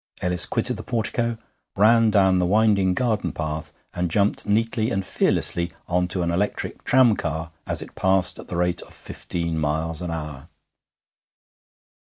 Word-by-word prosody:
Ellis 90 0 0
quitted - - +1
the - - -6
portico, 115 0 -1 0.4
ran 115 +2 +5
down 95 -3 +3
the 90 - +1
winding 100 -2 +3
garden 115 -4 0
path, 75 -1 -5 0.2
and 90 0 -2
jumped 100 +5 +1
neatly 110 +1 +1
and 95 -5 -2
fearlessly 85 0 0 0.2
on 90 0 +1
to 90 0 -1
an 85 - 0
electric 100 +4 -2
tramcar 85 -11 +2 0.2
as - - +2
it - - -14
passed 95 -1 +2
at - - -10
the - - -5
rate 90 0 0
of - - -13
fifteen 85 -2 -4
miles 80 +2 -2
an 90 - -4
hour. 75 -2 -6
90 Hz, 155 wpm, -23 LUFS, 85-105 Hz, 0.4 s, ran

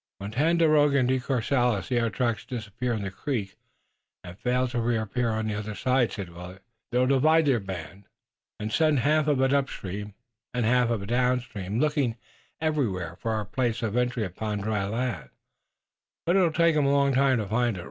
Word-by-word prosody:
"When 100 +1 -6
Tandakora 150 +1 +3
and 130 -2 +3
De 130 0 +2
Courcelles 125 -5 0
see 125 +1 0
our 115 -1 +1
traces 115 +1 -1
disappear 120 0 -3
in 110 -3 -3
the 100 - -4
creek 105 -2 -3 0.7
and 90 0 -9
fail 125 +4 0
to 120 -1 -1
reappear 115 +1 0
on 110 0 -1
the 110 - -2
other 105 0 -4
side," 125 +2 +1
said 100 -5 -6
Willet, 90 +2 -10 0.3
"they'll 125 +1 +3
divide 155 +5 +4
their 135 -5 +3
band 95 0 -8 0.5
and 105 +1 -4
send 155 -5 +3
half 150 +3 +2
of 145 -3 +2
it 135 +1 +3
upstream, 105 -7 -3 0.4
and 120 -2 +1
half 125 +1 +3 0.2
downstream, 120 -4 -1
looking 145 -5 +1 0.4
everywhere 110 - -1
for 115 - -4
our 110 -1 -2
place 115 +1 -1
of 110 -1 -1
entry 125 -1 0
upon 105 +2 -3
dry 100 -1 -1
land, 110 - -3 1.0
but 175 +2 +2
it'll 180 -4 +4
take 170 0 +3
'em 145 -2 +3
a - - +3
long 140 -1 +3
time 135 0 +3
to 110 - -2
find 115 +1 0
it. - - -6
120 Hz, 185 wpm, -26 LUFS, 105-135 Hz, 1.0 s, divide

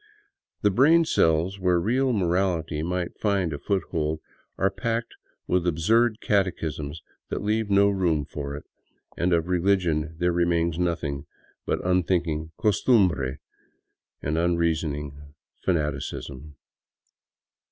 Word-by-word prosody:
The 105 - +4
brain 155 - +5
cells 85 - +2
where 90 -2 +2
real 125 +8 +1
morality 90 -6 0
might 90 +1 -3
find 100 -6 +1
a 70 - -5
foot 100 -4 0
hold 80 -2 -1 0.4
are 95 0 +2
packed 115 +1 -2 0.3
with 90 -1 +1
absurd 110 +8 +2
catechisms 80 -6 -1 0.3
that - - -3
leave 110 0 0
no 100 0 +5
room 90 -7 +1
for 70 0 -6
it; 75 - -8 0.5
and 90 +1 0
of 85 -1 +2
religion 85 -4 +1
there 90 +1 +1
remains 85 -1 +1
nothing 80 -5 -2 0.4
but - - -1
unthinking 85 -3 +1
costumbre 95 - +2 0.9
and 75 +3 0
un 85 0 +2
reasoning 75 -4 -1 0.4
fanaticism. 75 -3 -3
85 Hz, 120 wpm, -25 LUFS, 80-100 Hz, 0.9 s, brain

